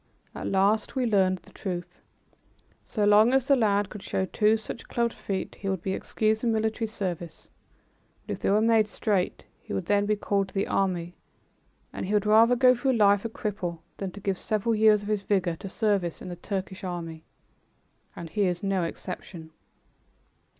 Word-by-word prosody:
At - - -5
last 200 +5 +2
we 260 -2 +1
learned 190 -4 +2
the - - -18
truth. 180 -3 -6 0.8
So 210 -3 -1
long 210 +4 +6
as 270 -2 +2
the 275 - +5
lad 205 -4 +1
could 210 - -8
show 190 - -1
two 215 +4 +2
such 220 +1 -8
clubbed 235 -1 0
feet, 195 -2 -4
he 195 - -3
would 190 -2 -2
be 190 - -1
excused 215 +2 0
from 235 - +1
military 220 +1 0
service; 180 -5 -5 0.7
but - - -3
if - - -7
they - - 0
were 205 +2 +4
made 225 -1 +4
straight 200 -3 -1 0.2
he - - -8
would 185 - -2 0.2
be 210 - +2
called 200 -1 0
to - - -16
the 195 - +1
army; 180 -3 -1 0.8
and - - -4
he 210 - 0
would 210 0 +2
rather 225 +3 +6
go 250 +1 +6
through 260 +2 0
life 205 -2 +4
a - - -1
cripple 200 -6 -4 0.2
than 195 - -3
to 205 - -9
give 195 -2 -2
several 215 +1 0
years 215 -1 +4
of 205 - -6
his 210 -2 0
vigor 190 -4 0
to 195 - -7
service 195 -5 0
in - - -8
the 175 - -5
Turkish 190 +1 -5
army. 165 -3 -5 0.9
And 165 -2 -8
he 200 +2 +1
is 175 0 -2
no 195 -2 +1
exception. 170 -1 -6
200 Hz, 190 wpm, -27 LUFS, 185-220 Hz, 0.9 s, long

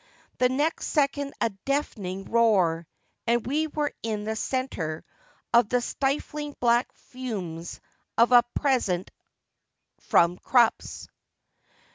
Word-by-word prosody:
The 250 - +4
next 290 +6 0
second 285 -1 0
a 230 - +2
deafening 195 -4 -3
roar, 185 -8 +2 0.4
and 235 0 +2
we 305 +5 0
were 295 -1 -2
in 215 -2 -3
the 220 +1 -2
centre 220 -11 -3 0.5
of 235 -2 +5
the 250 - +2
stifling 290 +3 -2
black 240 +1 +2
fumes 190 -10 -6 0.4
of 235 +2 +5
a 245 -1 +9
present 235 -11 0 0.9
from 175 +1 +3
Krupps. 240 -3 +1
235 Hz, 110 wpm, -26 LUFS, 195-275 Hz, 0.9 s, a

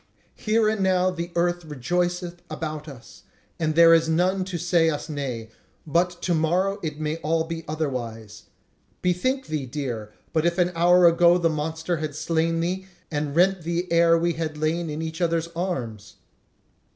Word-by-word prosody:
Here 220 0 +2
and 215 -1 0
now 185 -1 +2
the 170 -1 -5
earth 175 0 +1
rejoiceth 175 +4 -2
about 155 -1 -5
us, 135 -5 -12 0.4
and 155 -2 0
there 165 0 +8
is 165 0 +4
none 185 +4 +2
to 185 -2 -4
say 170 -1 +2
us 150 -2 -3
nay; 125 -7 -4 0.3
but 175 +3 0
to 180 - +1
morrow 180 +5 +1
it 155 -2 -4
may 155 +1 -2
all 160 0 0
be 165 0 -5
otherwise. 120 -8 -4 0.6
Bethink 255 +10 0
thee, 150 -4 -3
dear, 120 -6 -4
if - - -31 0.2
but 170 +2 +1
an 180 -1 +2
hour 175 +1 +5
ago 170 +1 +6
the 170 -2 +2
monster 160 +3 -2
had 155 -2 -4
slain 165 +1 0
thee, 185 +3 -2 0.2
and 145 -1 -2
rent 185 +2 +3
thee 170 +2 -2
ere 170 0 +5
we 170 +1 +1
had 155 -1 -4
lain 160 +2 -1
in 155 +2 -4
each 160 +2 -5
other's 165 -1 0
arms!" 125 - -4
165 Hz, 170 wpm, -24 LUFS, 155-175 Hz, 0.6 s, there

